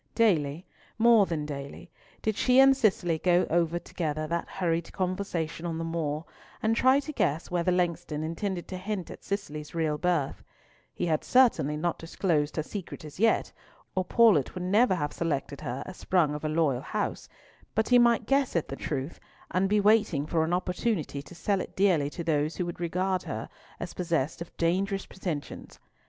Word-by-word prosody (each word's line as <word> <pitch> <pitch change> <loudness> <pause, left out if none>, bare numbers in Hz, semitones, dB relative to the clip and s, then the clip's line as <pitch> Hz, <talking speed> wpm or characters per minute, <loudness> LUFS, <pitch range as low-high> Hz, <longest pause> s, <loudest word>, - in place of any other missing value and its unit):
Daily—more 205 +4 +2
than 155 -3 -2
daily—did 150 +8 -6
she 250 +4 +4
and 270 0 +7
Cicely 190 -9 +1
go 180 +1 +3
over 170 0 +2
together 155 -3 -3
that 170 +2 -2
hurried 170 -3 -1
conversation 180 -4 -2
on 165 -1 -3
the 165 - -3
moor, 165 -2 -2 0.4
and 220 +1 +2
try 260 +3 +5
to 285 +2 -5
guess 155 - 0
whether 175 0 +1
Langston 170 -3 -1
intended 175 +3 -3
to 185 - -4
hint 190 -1 -4
at - - -11
Cicely's 155 -7 -5
real 155 -2 0
birth. 170 -6 0 0.5
He - - -1
had 160 -3 0
certainly 230 - +3
not 170 +2 -1
disclosed 165 -3 0
her 155 - -1
secret 185 -2 -7
as 150 +3 -11
yet, 225 +1 +3 0.4
or 185 - 0
Paulett 195 - +4
would 180 - -4
never 200 +3 +3
have 150 -4 -2
selected 145 -3 -2
her 130 -2 -4
as 185 - -9
sprung 170 -6 +2
of 150 - -5
a 155 - 0
loyal 150 -5 +1
house, - - -3 0.5
but 220 0 +1
he 245 -1 +7
might 235 -1 +4
guess 275 -1 +1
at 170 - 0
the 135 - -4
truth, 140 +1 -4 0.3
and 190 +2 +1
be 210 +1 +3
waiting 205 -8 +3
for 160 0 +1
an 160 - -1
opportunity 180 -4 -1
to 175 - -13
sell 195 +2 0
it - - -8
dearly 180 -7 +3
to 170 - -6
those 155 -1 0
who 180 - -2
would 175 -1 -6
regard 180 +2 0
her - - -5 0.3
as - - -5
possessed 165 -3 -1
of 170 - -9
dangerous 195 +4 0
pretensions. 170 -6 -6
175 Hz, 180 wpm, -28 LUFS, 155-195 Hz, 0.5 s, and